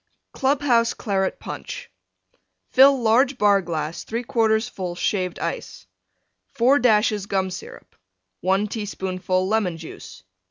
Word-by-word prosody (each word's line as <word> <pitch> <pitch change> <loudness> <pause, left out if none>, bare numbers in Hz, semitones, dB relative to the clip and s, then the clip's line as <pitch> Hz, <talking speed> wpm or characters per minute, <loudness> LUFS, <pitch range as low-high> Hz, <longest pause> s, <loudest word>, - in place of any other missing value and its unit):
CLUB 275 +2 0
HOUSE 235 -3 +3
CLARET 195 -3 -1
PUNCH - - -7 0.8
Fill 270 +1 +6
large 250 +4 +3
Bar 205 -2 +4
glass 160 -2 -4
3/4 225 -1 0
full 180 -2 -5
Shaved 185 -1 -1
Ice. - - -5 0.7
4 260 +5 +4
dashes 210 -3 +2
Gum 190 -2 -1
Syrup. 185 - -10 0.4
1 190 +3 +1
teaspoonful 190 -3 -2
Lemon 200 -5 0
Juice. 160 -1 -11
210 Hz, 115 wpm, -23 LUFS, 185-235 Hz, 0.8 s, Fill